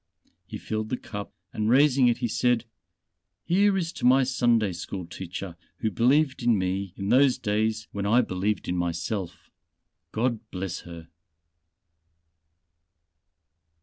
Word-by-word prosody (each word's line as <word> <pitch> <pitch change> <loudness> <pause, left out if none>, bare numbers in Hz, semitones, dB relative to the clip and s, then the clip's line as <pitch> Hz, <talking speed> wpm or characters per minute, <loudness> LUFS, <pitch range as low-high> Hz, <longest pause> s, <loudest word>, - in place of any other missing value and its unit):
He - - -6
filled 110 0 -4
the 125 - -1
cup 105 -3 -7 0.2
and 110 0 -1
raising 135 0 +5
it 120 - +2
he 120 - -1
said: 120 +1 +1 0.8
"Here 195 +3 +3
is 170 -3 -2
to - - -9
my 130 +2 +5
Sunday 120 -6 +2
school 90 +1 -6
teacher 90 +1 -7 0.2
who 110 - -1
believed 130 - +2
in 120 -2 +3
me 95 0 -2
in 100 0 -3
those 130 +2 +5
days 110 +1 -1
when 100 0 -3
I 120 +4 +5
believed 95 0 -2
in 90 - -1
myself. 90 +1 -3 0.6
God 115 0 0
bless 95 -1 -4
her." 85 -1 -10
110 Hz, 135 wpm, -26 LUFS, 95-125 Hz, 0.8 s, raising